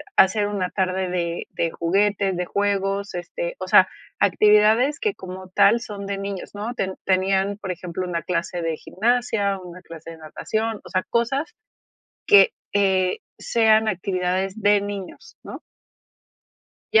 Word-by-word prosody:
hacer 205 +2 +4
una 200 -3 -2
tarde 185 -1 -1
de 170 -1 -3
de 165 -1 -1
juguetes, 195 +1 +1
de 180 - -1
juegos, 200 0 -1
este, - - -5
o - - -5
sea, - - +6 0.3
actividades 215 +7 +4
que 425 -2 -1
como 185 0 -9
tal 220 +5 +4
son 200 -2 -7
de 200 0 -3
niños, 195 -1 -5
¿no?, 215 +4 -4
te 190 -5 -2
tenían, 190 +1 +1
por 195 -3 -5
ejemplo, 180 +1 -5
una 170 -2 -3
clase 170 0 -2
de 165 -1 -2
gimnasia, 215 -3 0
una 180 0 -11
clase 165 0 -11
de 165 - -11
natación, 215 +8 -3
o - - -10
sea, 185 -1 0
cosas 270 - -1 0.7
que, 450 +3 +7 0.2
eh, 190 -2 +2 0.2
sean 220 -1 +3
actividades 185 +1 -1
de 205 0 +4
niños, 205 - -8
¿no? - - -8 1.3
Ya. 445 - +7
195 Hz, 150 wpm, -23 LUFS, 185-215 Hz, 1.3 s, que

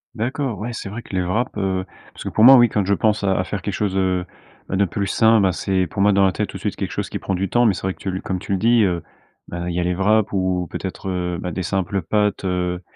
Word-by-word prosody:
D'accord, 125 +1 -2
ouais, 120 +3 -4
c'est 100 - -6
vrai 110 +4 -6
que 100 - -8
les 90 - +1
wraps, 110 +8 -1
heu, 95 -2 -1 0.3
parce - - -9
que, - - -3
pour 110 - +2
moi, 135 +2 +10
oui, 120 -2 +6
quand 105 -3 0
je 100 - +2
pense 105 0 +1
à 95 - +2
à 95 - +1
faire 95 0 -5
quelque 100 - -3
chose, 100 -2 -1
heu, 90 -1 +1 0.4
de 95 +1 +2
plus 100 +3 -3
sain, 110 0 +4
bah, 95 - +3
c'est 95 0 0
pour 100 +5 -1
moi 105 - +5
dans 100 0 +4
la 95 - +4
tête, - - -3
tout - - -7
de - - -12
suite, - - -3
quelque - - -4
chose - - -3
qui - - -4
prend 95 - -3
du 95 +1 -1
temps. 120 0 +3
Mais 105 - +4
c'est - - -6
vrai 95 -1 -2
que - - -29
tu 95 - -3
le 95 - -4
comme 95 - -3
tu 90 - -7
le 95 - +1
dis, 115 0 +4
heu, 90 -4 0 0.5
bah, 85 0 -5
il 85 - -3
y 90 - 0
a - - +1
les 90 0 0
wraps 105 +3 +2
ou 95 -2 0
peut-être, 95 0 -5
heu, 90 -2 -2
bah, 90 - -4
des 95 +3 -3
simples 95 0 -1
pâtes, 105 -1 0
heu, 90 -1 -1
95 Hz, 305 wpm, -21 LUFS, 90-105 Hz, 0.5 s, moi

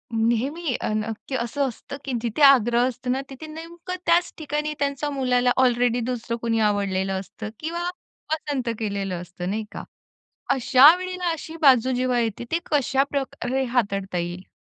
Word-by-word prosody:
नेहमी 250 +7 0
अ, - - -1
ना, 215 +1 -1 0.2
की 265 - -3
असं 260 +3 -1
असतं 260 +3 -8
की 270 - -3
जिथे 235 +5 -3
आग्रह 240 -2 +6
असतो 250 0 -5
ना, 260 +2 +1
तिथे 275 +4 -9
नेमकं 335 +3 -7
त्याच 345 +1 +3
ठिकाणी 300 0 -2
त्यांचा 280 +1 -1
मुलाला 250 -3 +2
ऑलरेडी 245 -1 +2
दुसरं 235 -1 -3
कुणी 225 -1 0
आवडलेलं 195 -1 -1
असतं 215 +3 -8
किंवा 340 +3 -3 0.4
पसंत 285 -6 -2
केलेलं 195 -4 -2
असतं 180 +1 -6
नाही 215 +2 -2
का. - - -7 0.7
अशा 270 +4 +7
वेळेला 365 -1 -3
अशी 325 0 -6
बाजू 260 -3 +5
जेव्हा 250 -1 +1
येते, 230 0 -2
ती 335 - +2
कशा 275 -2 +3
प्रकारे 265 -1 -2
हाताळता 195 -5 0
येईल? 175 +2 -4
250 Hz, 160 wpm, -24 LUFS, 225-290 Hz, 0.7 s, अशा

